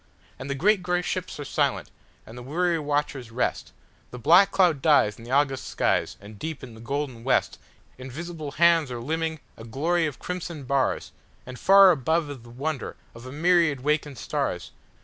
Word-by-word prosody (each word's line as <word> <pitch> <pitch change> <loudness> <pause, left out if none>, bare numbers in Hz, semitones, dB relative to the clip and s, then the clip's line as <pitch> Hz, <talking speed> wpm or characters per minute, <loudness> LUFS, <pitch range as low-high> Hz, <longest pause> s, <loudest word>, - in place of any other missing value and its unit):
And 130 - -7
the 140 - -1
great 200 +7 +3
gray 180 0 -1
ships 185 -3 -4
are 145 - -5
silent, - - -1 0.3
and 110 - -12
the 125 - -8
weary 165 +6 0
watchers 145 -4 -2
rest, 120 +3 -2 0.4
The 125 - -9
black 170 - +6
cloud 175 -7 +2
dies 140 -10 +3
in - - -12
the - - -11
August 135 0 +1
skies, - - 0
and 100 +1 -13
deep 160 -4 -5
in 125 -3 -9
the 110 - -13
golden 135 -1 -4
westInvisible 140 +4 -4
hands 165 -3 +4
are 120 -1 -5
limning 160 +4 -3 0.2
a 110 - -10
glory 160 +8 0
of 145 - -6
crimson 170 -4 -6
bars, 135 0 -1 0.3
And 125 0 -9
far 195 -1 +7
above 160 0 0
is 140 - -8
the 120 0 -15
wonder 135 +3 -4 0.2
of 115 +2 -11
a - - -8
myriad 165 -2 +2
wakened 150 -1 -1
stars! - - -3
145 Hz, 180 wpm, -25 LUFS, 130-170 Hz, 0.4 s, far